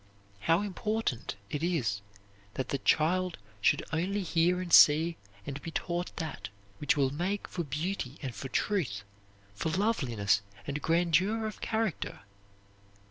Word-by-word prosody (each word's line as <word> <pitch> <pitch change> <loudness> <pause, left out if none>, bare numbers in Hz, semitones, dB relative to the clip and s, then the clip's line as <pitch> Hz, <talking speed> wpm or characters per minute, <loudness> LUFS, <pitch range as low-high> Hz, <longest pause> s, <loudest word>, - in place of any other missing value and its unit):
How 165 - +3
important 210 - -2 0.2
it 150 - -2
is 130 - 0 0.5
that 130 - -3
the 140 - -1
child 180 +6 +2 0.2
should - - +3
only 190 +5 0
hear 175 +1 +2
and 180 -2 -4
see 160 +3 +7 0.3
and 140 0 -5
be - - -5
taught 175 +2 -3
that 160 -2 -5 0.3
which 145 0 +2
will 135 -2 +3
make 185 +7 -2
for 175 - -3
beauty 150 -1 -3
and 130 -3 -3
for 135 - -6
truth, 130 - 0 0.5
for 135 +11 -2
loveliness 125 - +1 0.2
and 145 +1 -3
grandeur 175 +7 +2
of 215 - -5
character! 220 - -2
165 Hz, 135 wpm, -30 LUFS, 140-185 Hz, 0.5 s, see